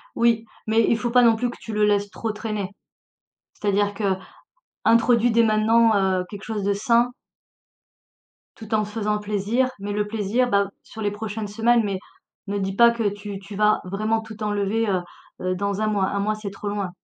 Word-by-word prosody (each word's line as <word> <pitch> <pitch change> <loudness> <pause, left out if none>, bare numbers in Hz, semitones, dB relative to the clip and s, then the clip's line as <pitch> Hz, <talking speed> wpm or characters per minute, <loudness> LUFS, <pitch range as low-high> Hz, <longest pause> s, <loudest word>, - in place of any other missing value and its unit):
Oui, 230 -1 +2 0.2
mais 225 +1 +3
il 230 - +3
faut 240 +1 -2
pas 250 +1 +5
non 230 -2 +5
plus 245 +2 -1
que - - -10
tu 225 - -7
le 210 0 +2
laisses 205 -1 +2
trop 225 +1 -3
traîner, 210 -2 -4 0.8
c'est-à-dire 205 0 0 0.7
qu'introduit 235 +1 +2
dès 230 +1 +4
maintenant, 225 +1 +4
heu, 190 -2 +1
quelque 205 -1 -9
chose 215 -2 -3
de 200 +1 +2
sain 235 +4 +2 1.5
tout 220 0 -5
en 215 - +3
te 210 - -5
faisant 210 -1 -1
plaisir, 210 +5 0
mais 200 +1 -4
le 210 0 0
plaisir, 220 +4 0
bah, 200 -2 +2
sur 220 - -11
les 205 - +1
prochaines 210 +1 -5
semaines 230 +2 +2
mais 200 -2 -2 0.5
ne 205 0 -2
dis 195 -1 -2
pas 235 +2 +7
que 230 -3 0
tu 205 0 -7
tu 200 +1 -10
vas 210 +1 +3
vraiment 215 +4 -1
tout 220 -1 -9
enlever, 210 +2 0
heu 185 -2 +1 0.4
heu, 185 0 0
dans 200 +2 -2
1 215 - +2
mois. 205 -3 +1
1 200 - -2
mois, 215 +2 0
c'est 215 -1 -6
trop 200 +1 -6
loin. 200 -2 -2
210 Hz, 195 wpm, -23 LUFS, 200-225 Hz, 1.5 s, pas